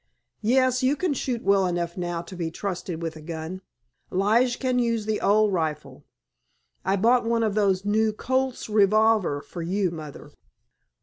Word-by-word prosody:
"Yes, 255 +3 +2
you 260 +3 +2
can 360 -1 -1
shoot 245 -3 -3
well 195 -1 +3
enough 170 -1 -2
now 175 -2 -3
to 185 - -10
be 170 -2 -3
trusted 175 -2 -5
with 165 -1 -4
a 155 - -10
gun. 165 +3 -6 0.5
Lige 225 +6 +2
can 255 -2 0
use 230 -3 0
the 215 0 -1
old 210 0 +3
rifle. 155 -3 -3 0.8
I 190 +1 +1
bought 235 +5 +3
one 230 0 +1
of 215 -2 0
those 195 -2 +1
new 215 +1 +2
Colt's 260 +4 -2
revolvers 210 -7 +3
for 175 - -7
you, 185 +2 0
Mother." 150 -2 -9
200 Hz, 165 wpm, -25 LUFS, 175-230 Hz, 0.8 s, well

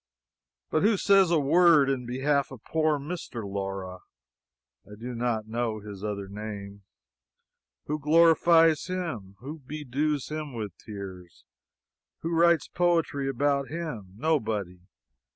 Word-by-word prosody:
But 155 - +2
who 210 +1 +3
says 195 -2 +5
a 170 -2 +3
word 155 0 +5
in 130 -3 -1
behalf 140 +3 +1
of 130 -4 -11
poor 155 -1 +1
Mr. 145 -6 -6
Laura? 95 -2 -4 0.8
(I 105 - -12
do 125 +2 -5
not 115 -2 -1
know 115 -1 -2
his 100 -1 -9
other 100 -2 -3
name.) 100 -1 -7 1.0
Who 150 +1 -2
glorifies 165 +1 +5
him? 145 - -4
Who 150 +5 -7
bedews 145 0 -2
him 155 -4 -5
with 105 -6 -5
tears? 95 -5 -9 0.8
Who 165 +1 -2
writes 170 0 +4
poetry 165 -6 +1
about 140 +1 +1
him? 135 - -6
Nobody. 110 - -1
135 Hz, 125 wpm, -27 LUFS, 105-160 Hz, 1.0 s, says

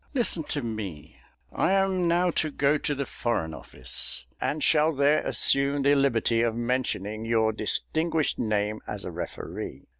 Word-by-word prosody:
Listen 215 -10 +2
to 145 -3 -3
me; 105 -9 -6 0.3
I 190 - +1
am 190 -2 +2
now 175 +1 +2
to 155 - 0
go 145 +1 +1
to 145 - -1
the 140 0 -2
Foreign 115 -11 -2
Office, 65 -4 -4 0.2
and 150 0 -1
shall 155 0 +4
there 145 +2 +3
assume 140 0 +3
the 140 +1 +5
liberty 120 -4 +2
of 115 -1 +1
mentioning 115 -3 -2
your 115 -1 +2
distinguished 160 +8 0
name 105 -1 -1
as 105 -1 -5
a 90 - -5
referee." 80 -5 -6
130 Hz, 155 wpm, -26 LUFS, 110-155 Hz, 0.3 s, the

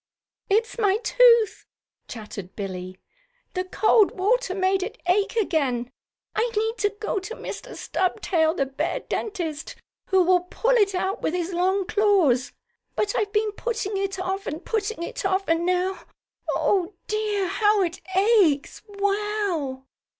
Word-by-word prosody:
"It's 450 +4 +1
my 405 -2 +3
tooth," 470 -4 +4 0.4
chattered 210 -5 -8
Billie. 185 -2 -6 0.6
"The 365 - -1
cold 425 +2 +3
water 410 +1 +1
made 380 0 +1
it 440 +5 -5
ache 395 +5 +2
again. 275 - 0 0.4
I 475 +2 +1
need 445 +1 0
to 410 - +2
go 430 -2 -1
to 380 +5 -7
Mr. - - -7
Stubtail, 335 -3 0
the 275 - +1
bear 300 - -2
dentist, 335 -8 -4 0.3
who 380 -1 +4
will 360 +1 +4
pull 360 +7 -1
it 410 -6 +3
out 380 +2 -1
with 320 - -1
his 355 +1 -2
long 375 +2 +1
claws. 360 - +3 0.4
But 420 - 0
I've 415 -3 0
been 425 0 +1
putting 430 -2 -3
it 390 0 -2
off, 380 +2 -3
and 315 +4 -5
putting 435 -4 -2
it - - -5
off, 385 0 0
and 330 +1 +1
now 365 +1 0 0.5
Oh, 380 -1 +1
dear, 425 -2 -1
how 415 +2 +2
it 340 0 -3
aches! 385 -8 +3
Wow!" 400 -9 -1
385 Hz, 145 wpm, -24 LUFS, 345-420 Hz, 0.6 s, tooth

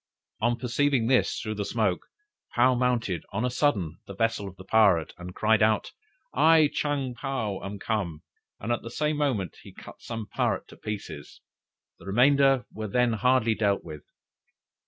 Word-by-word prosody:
On 120 +2 +1
perceiving 125 0 +1
this 130 +1 +2
through 110 -1 -4
the 105 -1 -3
smoke, 100 -4 -1 0.5
Paou 125 +2 +5
mounted 120 -8 0
on 110 +5 -1
a 125 - -1
sudden 100 - 0
the 100 - -8
vessel 115 -1 0
of 95 - -10
the 95 - -12
pirate, 95 -5 +3
and 90 +1 -8
cried 110 0 +3
out: 110 0 +2 0.4
'I 160 -2 +5
Chang 140 -4 -1
Paou 115 -5 -3
am 100 +1 -5
come,' 95 -7 -3 0.4
and 110 - -3
at 120 - 0
the 115 - -8
same 150 +5 -1
moment 125 - -1
he - - -13
cut - - -13
some 115 -2 -5
pirates - - -1
to - - -13
pieces; 100 -9 -7 0.6
the - - -13
remainder 135 +4 +4
were 110 0 -5
then 120 +3 +2
hardly 115 0 +2
dealt 100 -2 0
with. 75 -1 -9
110 Hz, 170 wpm, -27 LUFS, 100-125 Hz, 0.6 s, Paou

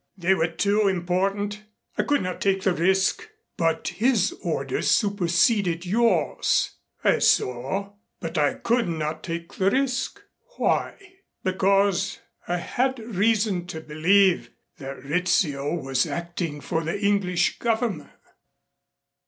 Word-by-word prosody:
"They 185 +1 +3
were 165 -3 +1
too 200 +5 +1
important. 195 +3 -1 0.3
I - - +1
could 290 -5 +1
not 185 0 -4
take 195 -1 +1
the 190 - +2
risk." 190 - +1 0.3
"But 165 -1 0
his 225 -4 +1
orders - - -1
superseded 185 -2 +2
yours." 235 - +2 0.3
"I - - +3
saw 135 +12 +1 0.3
but 165 - -6
I 145 -1 +2
could 235 0 0
not 160 -2 -3
take 170 -1 -6
the 190 0 +2
risk." 265 - -1 0.4
"Why?" - - +1 0.5
"Because 195 0 +2 0.3
I 175 - 0
had 260 +9 -1
reason 210 -4 0
to 160 - -6
believe 175 +5 +3 0.3
that 135 -2 -8
Rizzio 150 -2 0
was 135 -5 0
acting 170 -3 -4
for 160 +3 -2
the 165 +5 -3
English 200 -3 +1
Government." 220 -9 -1
185 Hz, 120 wpm, -25 LUFS, 170-205 Hz, 0.5 s, They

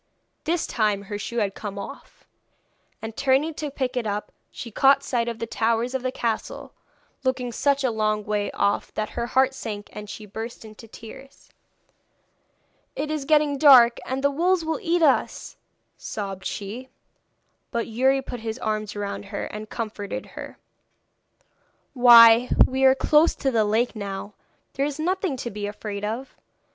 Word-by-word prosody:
This 335 +2 0
time 210 -3 0
her 205 +1 -6
shoe 235 +3 -5
had 205 -4 0
come 200 -1 -7
off, 200 +8 -10 0.8
and 220 0 -6
turning 275 +5 +2
to 300 0 -4
pick 265 -2 -3
it 240 -3 -1
up 205 0 -3 0.2
she 235 - -8
caught 275 +4 +4
sight 240 -3 -1
of 235 -1 -3
the 230 - -3
towers 230 +2 0
of 265 - -1
the 255 0 -2
castle, 230 -3 -4 0.5
looking 255 -2 -1
such 280 +3 +1
a 255 - +2
long 215 -1 0
way 210 -1 -1
off 200 - 0
that 215 - -2
her 235 - -3
heart 265 +1 +2
sank, 210 -6 -6
and 210 -1 -8
she 210 0 -8
burst 225 +3 -7
into 215 +1 -13
tears. 250 +5 -13 1.5
'It 305 - -3
is 305 -3 -3
getting 295 -2 +2
dark, 250 -5 +7
and 265 +1 -4
the 280 - +3
wolves 345 +3 +1
will 320 0 -1
eat 345 -3 +1
us,' 285 -4 +1 0.4
sobbed 195 -3 -6
she. 225 +6 -5 0.8
But 235 -1 -2
Youri 265 +4 +1
put 245 - -6
his 220 +1 -5
arms 215 -3 -3
round 205 0 -4
her 200 0 -5
and 215 +1 -8
comforted 215 -3 -5
her. - - -9 1.4
'Why 235 -1 +8 0.2
we 265 +1 +1
are 265 0 +6
close 300 +4 +3
to 270 - -1
the 225 -3 +2
lake 225 +4 +1
now. 200 0 -6 0.4
There 275 - 0
is 290 - -5
nothing 360 -2 -1
to 240 -1 -5
be 205 0 -4
afraid 205 0 -6
of! 230 +6 -4
235 Hz, 165 wpm, -24 LUFS, 215-270 Hz, 1.5 s, Why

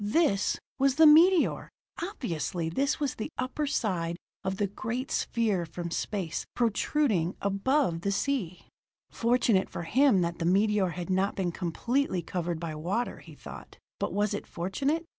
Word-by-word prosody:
This 205 -2 +2 0.2
was 270 -1 +3
the 320 +2 +7
meteor! 330 +4 +5 0.3
Obviously, 175 - -3
this 275 - 0
was 285 -3 -1
the 220 - -5
upper 260 +4 -2
side 175 - -1 0.3
of 190 0 -2
the 205 - +1
great 225 +6 -4
sphere 215 -6 0
from 170 +1 -6
space, 185 -3 -2
protruding 225 - +1
above 200 - +1
the 200 - 0
sea. 195 - -2 0.5
Fortunate 235 -4 +2
for - - -5
him 240 - +4
that 170 0 -2
the 165 - -1
meteor 200 +1 +3
had 175 +2 -5
not 190 +2 +1
been 180 -3 -1
completely 185 +4 -1
covered 170 -1 -3
by 165 -2 -4
water, 185 +10 -2
he - - -13
thought - - -11 0.2
but - - -1
was 205 +1 0
it 205 - -5
fortunate? 275 - -1
200 Hz, 155 wpm, -28 LUFS, 175-260 Hz, 0.5 s, the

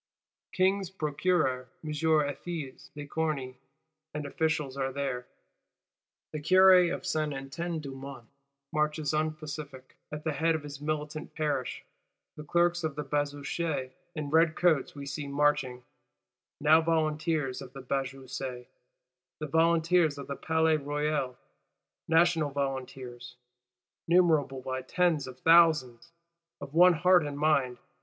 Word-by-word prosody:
King's 190 0 +1
procureur 150 -6 0 0.2
M. 155 - -4
Ethys 150 -1 -1
de 145 0 -6
Corny 140 -5 -3 0.6
and 150 -1 -3
officials 150 -2 -1
are 135 -1 -2
there; 135 -2 -3 1.0
the 155 - -4
Curé 185 +2 +6
of - - -5
Saint 155 -5 -1
Etienne 160 +6 -4
du 140 -3 -7
Mont 135 -2 -9 0.5
marches 150 -1 0
unpacific, 155 -3 -4 0.2
at 150 0 -6
the 155 - -1
head 160 +3 +1
of 155 - -4
his 145 -1 -9
militant 150 0 -4
Parish; 145 -5 -2 0.5
the 150 - -8
Clerks 175 +2 +1
of 155 -3 -2
the 150 - -3
Bazoche 145 0 -2 0.2
in 150 -2 -4
red 160 0 +4
coats 165 -6 +2
we 140 -1 -7
see 140 +1 -5
marching, 140 -3 0 0.8
now 155 +2 +5
Volunteers 155 -3 0
of 125 - -10
the 135 - -8
Bazoche; 130 -1 -4 0.7
the 155 - -5
Volunteers 165 0 +3
of 140 - -7
the 140 - -5
Palais 160 0 +2
Royal:—National 150 +3 -1
Volunteers, 130 -3 -5 0.7
numerable 160 -7 +3
by 130 0 -3
tens 160 0 +1
of 130 0 -10
thousands; 165 -4 +4 0.5
of 140 0 -9
one 180 +2 +7
heart 180 +1 +4
and 145 -1 -5
mind. 140 -5 +2
150 Hz, 125 wpm, -29 LUFS, 135-160 Hz, 1.0 s, one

